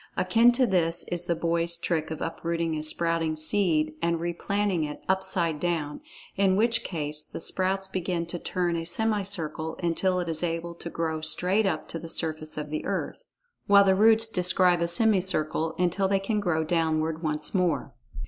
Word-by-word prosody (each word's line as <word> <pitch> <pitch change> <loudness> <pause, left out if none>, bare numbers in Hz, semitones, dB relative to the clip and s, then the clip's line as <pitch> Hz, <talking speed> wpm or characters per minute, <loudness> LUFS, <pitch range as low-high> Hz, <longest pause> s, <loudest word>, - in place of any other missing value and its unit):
Akin 225 +7 +4
to 255 +1 +3
this 175 -4 +1
is 175 0 -1
the 170 - 0
boy's 170 +1 0
trick 165 -2 -2
of 160 -1 -6
uprooting 165 0 -2
a 155 - -3
sprouting 165 0 0
seed, 155 -2 +1
and 170 0 0
replanting 175 +1 -1
it 150 -1 -6
upside 190 -4 0
down, 165 - -2 0.3
in 195 -1 +3
which 230 +3 +2
case 150 -3 -4
the - - -9
sprouts 190 +2 0
begin 180 -2 -2
to 170 +1 -6
turn 175 -1 -1
a 165 - -2
semicircle 180 -5 -2
until 180 +2 +1
it 175 - -3
is 160 -1 +1
able 170 0 -3
to 170 0 -8
grow 160 -2 -3
straight 185 +6 +3
up 160 -5 -2
to 165 - -4
the 165 - -8
surface 155 -2 -3
of 150 -1 -5
the 155 - -3
earth, - - -4 0.4
while 200 0 +7
the 190 -1 +4
roots 220 +3 +5
describe 180 -3 +2
a 170 - +1
semicircle 170 -5 +1
until 180 +2 +1
they 195 0 +2
can 210 +2 -1
grow 175 -5 0
downward 160 -1 0
once 155 -2 -2
more. 175 -7 0
170 Hz, 175 wpm, -27 LUFS, 160-190 Hz, 0.4 s, while